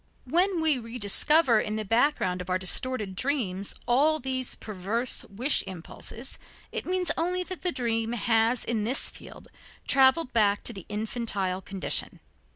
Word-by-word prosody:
When 350 +6 +1
we 305 -5 +4
rediscover 235 +4 +3
in 215 0 -2
the 215 0 -3
background 225 -5 +1
of 180 - -8
our 185 - +2
distorted 200 +2 0
dreams 200 -7 -2
all 290 +6 +3
these 260 -2 -2
perverse 215 +4 -2
wish 245 +9 +2
impulses, 190 +7 -7 0.3
it - - -4
means 365 -2 +1
only 360 +2 -1
that 370 0 -7
the 360 - +2
dream 230 -3 -1
has 230 +1 +1
in 225 -3 -1
this 250 +6 0
field - - -12 0.4
traveled 265 +1 +4
back 205 -3 +2
to 235 - 0
the 195 -4 -10
infantile 210 -3 -2
condition. 195 0 -2
235 Hz, 150 wpm, -27 LUFS, 205-275 Hz, 0.4 s, we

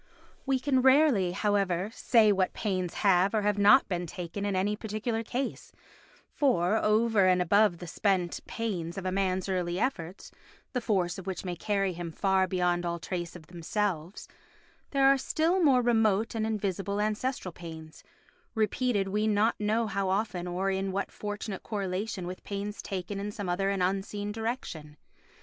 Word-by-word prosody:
We 265 -1 +2
can 260 -1 +2
rarely, 260 - +4
however, 195 -1 0
say 225 -5 +4
what 190 -2 +1
pains 185 -5 -2
have 195 +2 +4
or 215 - +1
have 205 0 +1
not 210 +7 +6
been 175 -2 -2
taken 180 +4 -5
in 200 -1 -1
any 200 +3 +1
particular 220 +2 -3
case, 250 +4 -4 0.6
for, 210 - +2
over 215 -2 +3
and 180 0 +4
above 200 +1 +3
the 175 - -8
spent 180 0 0
pains 180 -7 -3
of 190 - -5
a 185 - 0
man's 190 -1 0
early 180 -2 -1
efforts, 190 -8 -3 0.4
the 250 - -1
force 190 -6 0
of 190 - -10
which 190 0 -4
may 180 -1 -3
carry 195 +1 0
him 170 -1 -6
far 190 +2 +2
beyond 180 -1 0
all 170 0 -2
trace 175 0 -5
of 170 -3 -11
themselves, 175 +1 -3 0.6
there 275 -1 +2
are 275 0 +6
the - - -8
still 330 +7 +1
more 260 -5 +5
remote 225 -2 +2
and 220 -1 -1
invisible 200 -2 -2
ancestral 215 -1 -1
pains, 160 -2 -10 0.5
repeated 215 -1 +1
we 210 +2 0
know 215 +2 +3
not 215 +1 0
how 195 0 -1
often 190 -3 -1
or 185 +2 -1
in 190 0 -1
what 195 +1 -2
fortunate 205 -1 -5
correlation 200 -1 -3
with 180 +1 -7
pains 205 +1 -5
taken 195 0 -4
in 205 +1 -4
some 205 -2 -5
other 190 +2 0
and 195 -2 0
unseen 195 +2 -2
direction. 210 -10 -5
200 Hz, 170 wpm, -29 LUFS, 180-215 Hz, 0.6 s, not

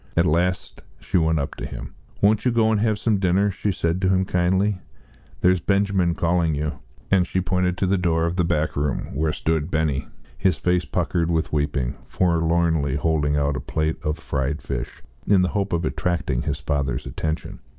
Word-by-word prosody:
At 85 - +5
last 90 +4 0 0.2
she 90 - 0
went 80 0 +2
up 70 -2 -2
to - - -5
him. - - -8 0.3
"Won't 105 +1 +4
you 125 - +3
go 115 -1 +3
and 110 - +2
have 110 -2 +2
some 105 -2 +1
dinner?" 95 +2 +2
she 100 +2 -1
said 85 0 -1
to 95 - +2
him 95 0 +2
kindly. 95 +2 +1 0.6
"There's 90 0 +4
Benjamin 100 -2 +1
calling 85 -2 +1
you," 75 +1 -3 0.3
and 95 -2 +4
she 95 - 0
pointed 90 0 0
to - - +1
the 95 0 +2
door 85 -2 +1
of 85 +1 -1
the 90 - +2
back 80 -2 0
room, 70 -2 -2
where 80 0 0
stood 80 0 -1
Benny, 75 -5 0 0.3
his 90 -5 +1
face 90 +2 +1
puckered 85 -1 0
with 80 -2 0
weeping, 70 -4 -1
forlornly 80 -4 +1
holding 75 -1 +1
out 70 0 +1
a - - -2
plate 80 0 -2
of 75 +1 -1
fried 70 -1 -2
fish, - - -5 0.2
in 95 -3 +5
the 90 - +1
hope 100 -1 -1
of 85 -1 0
attracting 85 -7 -1
his 75 -1 -2
father's 70 -3 -2
attention. 80 0 -4
85 Hz, 190 wpm, -23 LUFS, 75-95 Hz, 0.6 s, At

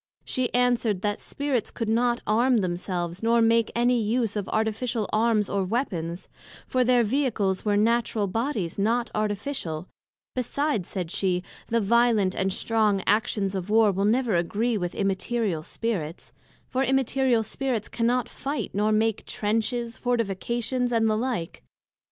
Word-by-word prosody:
she 255 -1 -1
answered, 240 -5 +1
That 205 -1 0
Spirits 280 -6 -2
could 230 - -4
not 240 +2 +2
arm 235 +2 +3
themselves, 175 -1 -3
nor 230 +1 +3
make 230 0 +3
any 240 0 +3
use 220 0 0
of 205 -2 -3
Artificial 220 +1 -1
Arms 215 -2 +2
or 200 -1 0
Weapons; 180 -6 -2 0.4
for 255 -1 +1
their 245 -1 +4
Vehicles 220 -6 0
were 205 -1 +2
Natural 225 -1 +2
Bodies, 205 - -2
not 230 +4 +1
Artificial: 205 - -3 0.5
Besides, 255 - -1
said 180 -4 -4
she, 180 -2 0 0.2
the 230 - +1
violent 225 -3 +3
and 190 0 0
strong 210 -1 +1
actions 205 -2 +1
of 190 0 -4
war, 220 -1 +5
will 195 +1 0
never 230 -1 +2
agree 215 +7 0
with 180 -4 -3
Immaterial 195 -2 -1
Spirits; 175 -3 -4 0.3
for 260 +1 0
Immaterial 265 -3 +2
Spirits 235 -1 -2
cannot 240 +1 0
fight, 280 +2 -4
nor 210 +2 +1
make 220 0 +1
Trenches, 230 +3 -1
Fortifications, 240 +2 -1
and 225 -1 +2
the 215 - +2
like. 225 -7 -3
225 Hz, 145 wpm, -26 LUFS, 200-240 Hz, 0.5 s, war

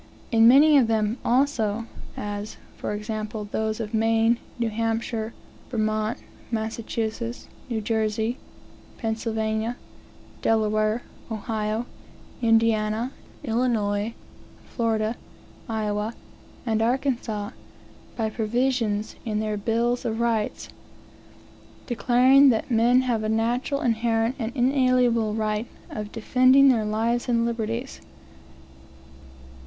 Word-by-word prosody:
In 225 -1 +6
many 285 +4 +7
of 245 - +3
them 220 +1 0
also, 235 -4 +1 0.3
as, 205 +1 -5 0.2
for - - -4
example, 215 0 -4
those 220 0 -1
of 220 -1 -5
Maine, 225 +1 +3 0.2
New 230 -2 -1
Hampshire, 225 0 -2 0.4
Vermont, 215 -1 0 0.3
Massachusetts, 225 +1 -3 0.2
New 225 -2 -1
Jersey, 220 +2 -1 0.6
Pennsylvania, 220 0 -2 0.6
Delaware, 215 +1 +1 0.3
Ohio, 220 0 -2 0.6
Indiana, 225 +1 +2 0.3
Illinois, 225 -3 0 0.6
Florida, 225 -1 0 0.5
Iowa, 215 0 -2 0.5
and 220 -2 +1
Arkansas, 235 -4 -1 0.6
by 220 -2 -1
provisions, 225 -2 0
in 215 -3 -1
their 215 -1 -1
bills 230 +4 0
of 225 -1 -2
rights, 230 -2 -1 1.2
declaring 255 +4 +5
that 230 +1 0
men 240 +2 +4
have 240 -4 0
a 215 - -1
natural, 240 +5 0
inherent, 230 0 +1
and 225 -1 -2
inalienable 250 -4 +2
right 215 +1 -1 0.2
of 210 -1 -5
"defending 255 +4 +5
their 225 -4 +2
lives 230 +4 0
and 230 -1 +2
liberties." 235 +2 -3
225 Hz, 100 wpm, -25 LUFS, 215-240 Hz, 1.2 s, many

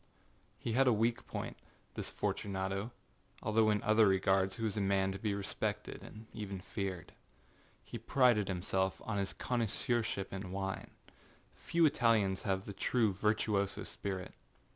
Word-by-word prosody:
He - - -3
had 135 +2 +4
a - - +7
weak 115 +2 +1
pointâthis - - -22 0.8
Fortunatoâalthough 100 +2 -1
in 105 -1 0
other 110 -1 +5
regards 95 0 +3
he 115 - -4
was 110 -3 0
a 105 - 0
man 95 -1 +2
to 95 - -5
be 105 -2 0
respected 100 -1 -2
and 110 +1 -11
even 100 -3 -5
feared. 95 -2 -4 0.7
He 120 - -6
prided 115 -3 +4
himself 95 +1 0
on 105 -3 -1
his 100 0 -1
connoisseurship 115 -3 -1
in 95 -1 -5
wine. 95 0 -3 0.6
Few 170 -1 +2
Italians 115 -9 +3
have 95 -1 -1
the 100 - -6
true 110 -1 +2
virtuoso 105 0 +1
spirit. 95 -2 -5
100 Hz, 140 wpm, -34 LUFS, 95-115 Hz, 0.8 s, a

